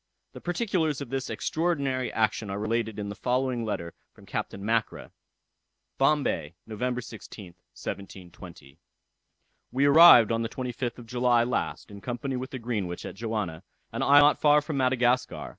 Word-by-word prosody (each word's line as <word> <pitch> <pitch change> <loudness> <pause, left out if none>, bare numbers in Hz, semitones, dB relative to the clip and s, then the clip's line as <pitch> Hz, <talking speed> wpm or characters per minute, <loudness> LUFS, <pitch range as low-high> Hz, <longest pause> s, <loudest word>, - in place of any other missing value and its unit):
The - - -10
particulars 175 - -1
of 140 -4 -7
this 135 -1 -3
extraordinary 140 -6 -1
action 110 -1 0
are 100 - -3
related 110 0 -2
in 100 -1 -4
the 100 - -6
following 125 0 -1
letter 95 -6 -4 0.2
from - - -17
Captain 100 - -5
Mackra. 115 0 -1 0.9
"Bombay, 135 - +1
November 125 +3 -3
16th, 105 -5 -11 0.2
1720. 90 -6 -9 0.9
"We 135 +3 +2
arrived 145 -6 +8
on 115 0 0
the 115 - -2
25th 125 -1 -4
of 120 - -11
July 120 0 +2
last, 120 -2 -3
in 100 0 -10
company 125 +4 -4
with 130 +1 -4
the 130 - -6
Greenwich, 105 -8 -4
at - - -6
Johanna, 105 -7 -4 0.3
an - - -4
island 145 +1 +6
not 150 - +3
far 150 0 +6
from 150 -1 -4
Madagascar. 125 -1 +1
120 Hz, 155 wpm, -27 LUFS, 110-135 Hz, 0.9 s, arrived